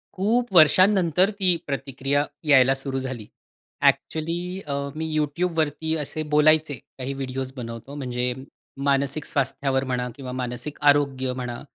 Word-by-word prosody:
खूप 230 Hz, +5 st, +1 dB
वर्षानंतर 185 Hz, +2 st, +5 dB
ती 180 Hz, -2 st, +3 dB
प्रतिक्रिया 140 Hz, +1 st, -1 dB, 0.2 s
यायला 135 Hz, -3 st, +6 dB
सुरू 135 Hz, 0 st, -3 dB
झाली. 130 Hz, -5 st, -5 dB, 0.6 s
ॲक्चुअली 165 Hz, +2 st, +1 dB, 0.3 s
अ, 140 Hz, -, -2 dB, 0.2 s
मी 160 Hz, +1 st, -3 dB
Youtubeवरती 160 Hz, 0 st, -1 dB
असे 155 Hz, +1 st, -3 dB
बोलायचे, 155 Hz, 0 st, +4 dB, 0.2 s
काही 135 Hz, +1 st, -4 dB
व्हिडिओज 130 Hz, -1 st, -4 dB
बनवतो 115 Hz, +3 st, -7 dB
म्हणजे 125 Hz, -2 st, -2 dB, 0.5 s
मानसिक 140 Hz, +1 st, +1 dB
स्वास्थ्यावर 135 Hz, -1 st, 0 dB
म्हणा 125 Hz, -1 st, -2 dB
किंवा 130 Hz, -2 st, -7 dB
मानसिक 125 Hz, +2 st, -4 dB
आरोग्य 135 Hz, -3 st, +2 dB
म्हणा 125 Hz, -2 st, -5 dB
140 Hz, 125 wpm, -24 LUFS, 130-155 Hz, 0.6 s, यायला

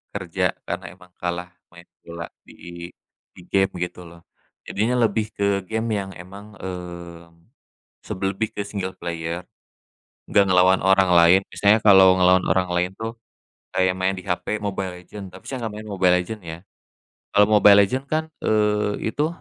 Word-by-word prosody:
kerja -, -, -1 dB
karena -, -, -5 dB
emang 90 Hz, 0 st, -19 dB
kalah 85 Hz, 0 st, -3 dB, 0.2 s
main 85 Hz, 0 st, -15 dB, 0.2 s
bola 85 Hz, 0 st, -7 dB, 0.2 s
di 85 Hz, 0 st, -10 dB, 0.5 s
di -, -, -13 dB
game 95 Hz, 0 st, +3 dB
gitu 90 Hz, 0 st, -7 dB
loh. 85 Hz, 0 st, -15 dB, 0.4 s
Jadinya 110 Hz, +5 st, -1 dB
lebih 110 Hz, 0 st, +1 dB
ke 100 Hz, -1 st, +1 dB
game 110 Hz, +2 st, -2 dB
yang 95 Hz, -1 st, -6 dB
emang, 100 Hz, +4 st, -12 dB
eee, 85 Hz, -2 st, -8 dB, 0.8 s
sebel 95 Hz, +1 st, -2 dB
lebih 110 Hz, +3 st, -4 dB
ke -, -, -2 dB
single 100 Hz, -2 st, -5 dB
player, 85 Hz, +1 st, -5 dB, 0.8 s
nggak 100 Hz, -, +4 dB
ngelawan 90 Hz, +1 st, +4 dB
orang 95 Hz, 0 st, +4 dB
lain. 85 Hz, +2 st, +7 dB, 0.2 s
Misalnya 105 Hz, +2 st, +4 dB
kalau 95 Hz, -3 st, +6 dB
ngelawan 90 Hz, 0 st, +5 dB
orang 95 Hz, -1 st, +1 dB
lain 90 Hz, +1 st, 0 dB
tuh 115 Hz, +1 st, -5 dB, 0.6 s
kayak 95 Hz, 0 st, +2 dB
main 95 Hz, +1 st, 0 dB
di 95 Hz, -, -8 dB
HP 95 Hz, +3 st, -3 dB
Mobile 95 Hz, -2 st, -3 dB
Legends, 95 Hz, 0 st, -10 dB
tapi -, -, -12 dB
saya 130 Hz, -, -4 dB
nggak 105 Hz, -, -6 dB
main 110 Hz, 0 st, -8 dB
Mobile 90 Hz, -2 st, +3 dB
Legends 105 Hz, +3 st, -8 dB
ya. 80 Hz, 0 st, -6 dB, 0.8 s
Kalau 105 Hz, 0 st, +6 dB
Mobile 100 Hz, -1 st, +7 dB
Legends 130 Hz, +7 st, -2 dB
kan, 155 Hz, +2 st, -1 dB, 0.2 s
eee, 105 Hz, 0 st, +1 dB
itu 150 Hz, +6 st, 0 dB
95 Hz, 160 wpm, -22 LUFS, 90-105 Hz, 0.8 s, lain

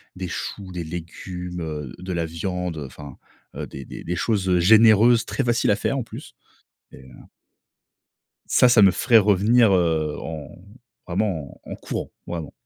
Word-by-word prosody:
des 90 Hz, 0 st, -5 dB
choux, 95 Hz, +3 st, -6 dB
des 90 Hz, -1 st, -5 dB
légumes, 90 Hz, +2 st, -7 dB
heu, 75 Hz, -5 st, -5 dB
de 90 Hz, +1 st, -6 dB
la 85 Hz, -1 st, -1 dB
viande, 90 Hz, +1 st, -4 dB
heu, 75 Hz, -, -5 dB
enfin, 70 Hz, +1 st, -11 dB, 0.4 s
heu, -, -, -5 dB
des 70 Hz, -1 st, -9 dB
des -, -, -9 dB
des 90 Hz, -, -3 dB
choses 95 Hz, -1 st, +1 dB
généreuses, 110 Hz, +4 st, +6 dB
très 135 Hz, -, -2 dB
faciles 120 Hz, -1 st, +1 dB
à -, -, +3 dB
faire 135 Hz, -, -2 dB
en -, -, -3 dB
plus -, -, -11 dB, 0.6 s
mais -, -, -12 dB
heu 65 Hz, -, -16 dB, 1.4 s
Ca, 125 Hz, -, +6 dB
ça 120 Hz, -3 st, +5 dB
me 100 Hz, -, +8 dB
ferait 115 Hz, +4 st, +4 dB
revenir, 105 Hz, +3 st, +4 dB
heu, 80 Hz, -4 st, +1 dB
en 80 Hz, -3 st, -7 dB, 0.6 s
vraiment 90 Hz, -6 st, -3 dB
en -, -, -7 dB
courant. -, -, -5 dB, 0.2 s
Vraiment. 85 Hz, -3 st, -6 dB
90 Hz, 165 wpm, -23 LUFS, 80-105 Hz, 1.4 s, me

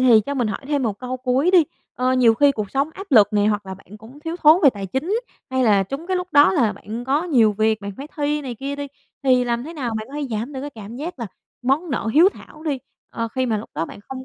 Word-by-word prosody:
thì 240 Hz, -4 st, +6 dB
cho 285 Hz, -, -2 dB
mình 245 Hz, -5 st, 0 dB
hỏi 210 Hz, -, -4 dB
thêm 285 Hz, -1 st, 0 dB
1 215 Hz, -4 st, -2 dB
câu 255 Hz, 0 st, -4 dB
cuối 255 Hz, +6 st, +1 dB
đi. 360 Hz, -4 st, +6 dB, 0.3 s
Ơ, 255 Hz, +1 st, +1 dB
nhiều 245 Hz, -3 st, +5 dB
khi 285 Hz, +4 st, +4 dB
cuộc 215 Hz, -6 st, -4 dB
sống 275 Hz, +3 st, 0 dB
áp 390 Hz, -, -8 dB
lực 210 Hz, -4 st, +7 dB
nè, 205 Hz, -1 st, +2 dB
hoặc 210 Hz, -1 st, +1 dB
bạn 190 Hz, +1 st, -10 dB
cũng 235 Hz, +7 st, -14 dB
thiếu 325 Hz, +2 st, -4 dB
thốn 310 Hz, +4 st, +7 dB
về 280 Hz, -, +7 dB
tài 200 Hz, -4 st, -6 dB
chính, 325 Hz, -, -1 dB, 0.3 s
hay 260 Hz, 0 st, +1 dB
là 205 Hz, -4 st, +4 dB
trúng 275 Hz, -, -6 dB
cái 375 Hz, 0 st, 0 dB
lúc 360 Hz, 0 st, -3 dB
đó 290 Hz, -1 st, +6 dB
là 240 Hz, -, +2 dB
bạn 220 Hz, +5 st, -7 dB
có 280 Hz, +4 st, +1 dB
nhiều 235 Hz, -10 st, +4 dB
việc, 220 Hz, +1 st, +1 dB
bạn 200 Hz, 0 st, -6 dB
phải 275 Hz, -, -7 dB
thi 295 Hz, 0 st, 0 dB
này 255 Hz, -3 st, -5 dB
kia 275 Hz, +4 st, -5 dB
đi, 285 Hz, 0 st, -4 dB, 0.4 s
thì 255 Hz, -2 st, +3 dB
làm 240 Hz, 0 st, -1 dB
thế 320 Hz, -, -7 dB
nào 255 Hz, -8 st, -3 dB
bạn 215 Hz, 0 st, -4 dB
có 275 Hz, -, -11 dB
thể 295 Hz, -1 st, -3 dB
giảm 225 Hz, +5 st, -3 dB
được 265 Hz, -, -5 dB
cái 290 Hz, +2 st, -6 dB
cảm 220 Hz, -2 st, -10 dB
giác 310 Hz, +3 st, -6 dB
là 235 Hz, -, -4 dB, 0.4 s
món 285 Hz, +7 st, 0 dB
nợ 245 Hz, -, -2 dB
hiếu 335 Hz, +5 st, +7 dB
thảo 310 Hz, -, -14 dB
đi, 290 Hz, -4 st, -1 dB, 0.3 s
ờ, 230 Hz, 0 st, -3 dB
khi 260 Hz, +3 st, -1 dB
mà 225 Hz, -3 st, 0 dB
lúc 210 Hz, -, -9 dB
đó -, -, -1 dB
bạn -, -, -11 dB
không 265 Hz, -1 st, -7 dB
255 Hz, 280 wpm, -21 LUFS, 220-290 Hz, 0.4 s, lực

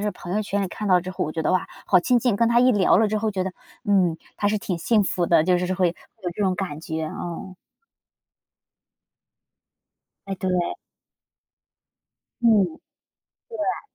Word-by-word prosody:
这 210 Hz, -, 0 dB
儿 -, -, -3 dB
朋 180 Hz, +1 st, -6 dB
友 215 Hz, -, +1 dB
圈 200 Hz, 0 st, -1 dB
里 190 Hz, -, -2 dB
看 210 Hz, +3 st, -5 dB
到 180 Hz, -1 st, +5 dB
之 185 Hz, -, -5 dB
后， 185 Hz, -, -3 dB
我 155 Hz, -, -3 dB
觉 160 Hz, -1 st, -2 dB
得， -, -, +1 dB
哇， 185 Hz, -, +1 dB, 0.2 s
好 185 Hz, -, +5 dB
亲 245 Hz, +7 st, +3 dB
近， 235 Hz, -3 st, +1 dB
跟 230 Hz, +1 st, +3 dB
她 235 Hz, 0 st, +4 dB
一 250 Hz, +1 st, +5 dB
聊 195 Hz, -4 st, +4 dB
了 220 Hz, -, +4 dB
之 215 Hz, 0 st, 0 dB
后 220 Hz, 0 st, 0 dB
觉 190 Hz, -2 st, -2 dB
得， 190 Hz, -, -4 dB, 0.3 s
嗯， 185 Hz, -6 st, +3 dB, 0.2 s
她 205 Hz, -, +1 dB
是 215 Hz, -, +1 dB
挺 185 Hz, -2 st, -3 dB
幸 215 Hz, +4 st, +3 dB
福 180 Hz, -2 st, 0 dB
的， 165 Hz, -2 st, +4 dB
就 180 Hz, 0 st, +3 dB
是 180 Hz, -, -1 dB
是 185 Hz, -, -1 dB
会 180 Hz, -1 st, +2 dB
有 180 Hz, +2 st, -8 dB
这 210 Hz, -, -2 dB
种 185 Hz, -1 st, +2 dB
感 175 Hz, -5 st, -4 dB
觉， 160 Hz, 0 st, -4 dB
哦。 175 Hz, +3 st, -6 dB, 2.7 s
哎， 195 Hz, -, -3 dB
对。 185 Hz, 0 st, -2 dB, 1.9 s
嗯， 220 Hz, -4 st, +5 dB, 1.0 s
对。 -, -, -1 dB
190 Hz, 200 characters per minute, -24 LUFS, 180-210 Hz, 2.7 s, 到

